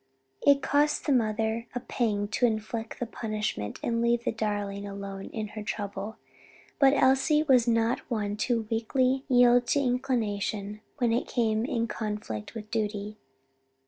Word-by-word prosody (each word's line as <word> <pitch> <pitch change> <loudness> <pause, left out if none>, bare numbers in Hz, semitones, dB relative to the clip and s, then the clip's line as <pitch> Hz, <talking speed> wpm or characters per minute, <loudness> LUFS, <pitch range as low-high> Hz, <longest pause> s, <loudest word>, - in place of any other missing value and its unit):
It 280 -1 +4
cost 295 +1 +2
the 295 - +1
mother 225 -1 +1
a - - 0
pang 215 -4 -1
to 240 +3 +2
inflict 225 0 -4
the 245 - -1
punishment 215 - -3
and 230 -1 0
leave 235 0 +2
the - - 0
darling 205 -2 -3
alone 195 -1 -6
in 215 -2 -5
her 215 - -7
trouble; 205 0 -4 0.6
but 275 0 +6
Elsie 270 +3 +4
was 255 -5 +4
not 230 0 +2
one 210 -4 -1
to 230 0 0
weakly 255 +4 +1
yield 245 -1 +5
to 285 - +2
inclination 215 -5 -1 0.2
when 240 -2 +2
it 240 - 0
came 225 -2 +1
in 235 -4 -1
conflict 210 - -5
with 215 -1 -8
duty. 210 -1 -2
225 Hz, 150 wpm, -28 LUFS, 210-245 Hz, 0.6 s, but